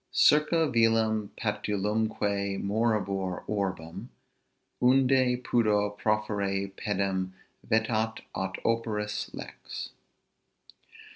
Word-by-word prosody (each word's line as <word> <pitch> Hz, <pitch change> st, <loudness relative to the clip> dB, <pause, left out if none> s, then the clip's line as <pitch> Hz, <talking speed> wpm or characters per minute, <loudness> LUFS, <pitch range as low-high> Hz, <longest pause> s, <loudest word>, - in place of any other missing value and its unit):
Circa 155 Hz, +2 st, +4 dB
vilem 115 Hz, -4 st, +2 dB
patulumque 105 Hz, -1 st, -1 dB
morabimur 100 Hz, -3 st, 0 dB
orbem, 95 Hz, -6 st, -3 dB, 0.7 s
Unde 130 Hz, -1 st, +4 dB
pudor 105 Hz, -3 st, +2 dB
proferre 100 Hz, -2 st, -1 dB
pedem 95 Hz, -2 st, -1 dB, 0.4 s
vetat 110 Hz, 0 st, +1 dB
aut 95 Hz, 0 st, -3 dB
operis 110 Hz, -2 st, -1 dB
lex. -, -, -7 dB
105 Hz, 70 wpm, -28 LUFS, 100-115 Hz, 0.7 s, Circa